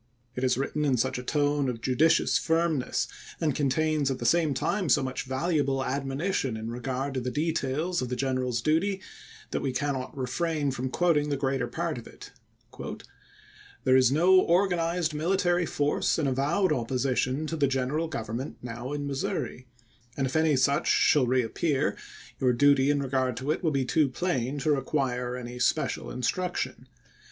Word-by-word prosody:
It 125 - -3
is 125 -2 +2
written 145 +3 -1
in 135 -4 +2
such 130 +2 0
a - - -6
tone 145 0 +1
of 120 -2 -4
judicious 140 +7 +3
firmness, 160 -4 0 0.3
and 155 -3 +1
contains 150 +1 +1
at 135 - -1
the 120 - -5
same 155 +1 +3
time 190 +4 -1
so 135 - +4
much 130 0 -3
valuable 135 0 0
admonition 135 - -1
in 110 +1 -5
regard 130 +3 -3
to 130 - -1
the 125 0 -3
details 155 +3 -1
of 125 - -3
the 125 - -2
general's 130 -3 -1
duty, 190 +6 +1 0.5
that - - -1
we 135 - -1
cannot 135 0 -3
refrain 145 +3 -1
from 130 0 -3
quoting 150 -1 +2
the 140 - 0
greater 135 -2 -1
part - - -3
of - - -12
it: - - -12 1.5
There 130 - +4
is 130 -1 +5
no 180 +6 +5
organized 175 -2 +1
military 175 +2 +1
force 145 0 0
in 160 - 0
avowed 145 +8 +1
opposi 130 0 0
tion 135 +5 0
to 165 - -3
the 145 -3 +2
General 135 +5 -1
Government 115 -2 -5
now 125 +3 -5
in 145 -1 -3
Missouri, 135 -2 -3 0.5
and 135 - +1
if 130 - -4
any 160 -2 +3
such 135 +2 +2
shall 140 -4 +4
reappear, 130 +4 +1 0.4
your 125 -2 +3
duty 140 +1 +4
in 145 -1 +2
regard 130 -2 0
to 135 +5 -1
it 155 - -1
wiU 165 -4 +1
be 135 -2 0
too 150 +2 +2
plain 135 -3 -1
to 155 - +2
require 130 -3 -1
any 125 0 -7
special - - 0
instruction. 180 +9 -2
140 Hz, 170 wpm, -27 LUFS, 130-155 Hz, 1.5 s, is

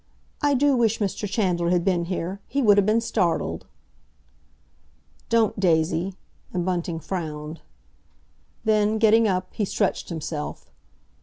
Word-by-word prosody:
"I 290 -2 +3
do 280 +1 +3
wish 225 -3 +2
Mr. 205 0 -2
Chandler 180 -4 0
had 175 -1 +1
been 175 -3 +1
here. 180 +2 -3
He 280 0 -1
would 205 -3 +6
'a - - +6
been 215 +3 +2
startled!" 175 -7 -1 1.6
"Don't, 225 -3 +2
Daisy!" 170 +1 +1 0.4
and 175 -1 -2
Bunting 175 -2 -2
frowned. 155 -2 -5 1.0
Then, 215 0 +2
getting 220 +1 +5
up, 185 -2 -2
he 215 - -2
stretched 195 - -1
himself. 155 -2 -5
190 Hz, 130 wpm, -24 LUFS, 170-215 Hz, 1.6 s, would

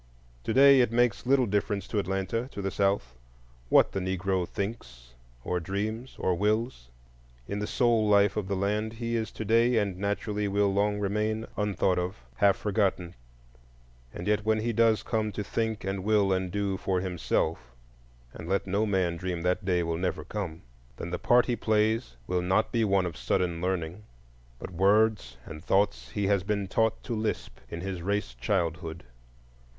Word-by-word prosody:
Today 135 0 +6
it 120 - +1
makes 120 -1 +1
little 130 -1 +4
difference 105 -1 -1
to 105 - 0
Atlanta, 95 +5 -2
to 100 - -5
the 95 - -1
South, 100 -11 0 0.6
what - - +5
the 95 - -2
Negro 95 -1 -1
thinks 65 - -6 0.3
or 90 - -1
dreams 110 +8 -4
or 90 - +1
wills. 105 - -1 0.6
In 100 - -3
the 105 - -2
soul 115 -3 +2
life 100 -1 +4
of 105 -3 -2
the 100 - -1
land 105 +3 -1
he 115 +1 -3
is 110 -2 -1
to 110 - -5
day, 115 +3 +3
and 100 -4 -1
naturally 105 +1 -1
will 100 0 +1
long 105 +1 +1
remain, 105 +2 -1
unthought 100 -3 +1
of, 90 +2 -3 0.2
half 100 -1 +4
forgotten; 95 -4 0 1.0
and - - -7
yet 105 0 +1
when 110 0 +1
he 115 +1 -1
does 115 -1 +3
come 110 -2 -1
to 105 - -3
think 110 +1 -2
and 95 -1 -3
will 105 -2 +3
and 95 0 -1
do 100 -1 -1
for 95 -1 -1
himself,—and - - -4
let 100 +1 +1
no 100 +3 0
man 90 -4 0
dream 90 -1 -3
that 90 +4 0
day 90 -2 +1
will 85 0 -2
never 90 -4 -2
come,—then 80 - -7
the 90 - -2
part 120 0 +4
he 120 - 0
plays 110 - +1
will 90 +4 0
not 95 +4 +1
be 115 -1 +1
one 100 -3 +2
of 85 -3 -4
sudden 85 -3 -1
learning, 90 0 -2 0.6
but - - -8
words 100 - +2
and 80 -1 -9
thoughts 65 -13 +1
he 100 +6 -2
has 100 -1 +2
been 100 0 -2
taught 110 +3 0
to 120 - -3
lisp 110 0 -3
in 85 - -6
his 95 -2 -4
race 100 -8 -2
childhood. 85 +4 -2
100 Hz, 175 wpm, -28 LUFS, 90-110 Hz, 1.0 s, Today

